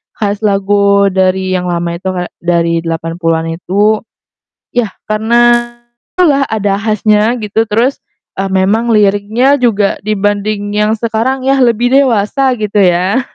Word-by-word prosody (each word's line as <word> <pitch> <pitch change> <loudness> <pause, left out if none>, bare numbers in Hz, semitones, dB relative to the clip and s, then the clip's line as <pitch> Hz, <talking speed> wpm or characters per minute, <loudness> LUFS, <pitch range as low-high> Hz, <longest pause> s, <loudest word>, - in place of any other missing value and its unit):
khas 205 0 -2
lagu 200 -1 +2
dari 185 0 0
yang 180 -1 -2
lama 170 0 -2
itu, 180 +2 -4
kayak 180 -1 -4
dari 170 -1 0
80-an 165 0 -2 0.2
itu, 210 +4 +1 0.7
ya 245 -3 0 0.2
karena 240 +2 +1 0.4
ada 365 - +3
lah, 280 -4 +3
ada 205 -2 -1
khasnya 215 +1 +1
gitu, 225 0 -2
terus, 235 +6 0 0.4
eee, 195 - -1
memang 195 +5 +1
liriknya 215 +6 +2
juga 210 -5 +1
dibanding 205 0 -2
yang 210 +1 +1
sekarang 235 +4 -2
ya, 270 0 +2
lebih 240 0 +2
dewasa, 260 0 +2
gitu 210 -2 -1
ya. 185 +5 +2
210 Hz, 135 wpm, -12 LUFS, 190-230 Hz, 0.7 s, ada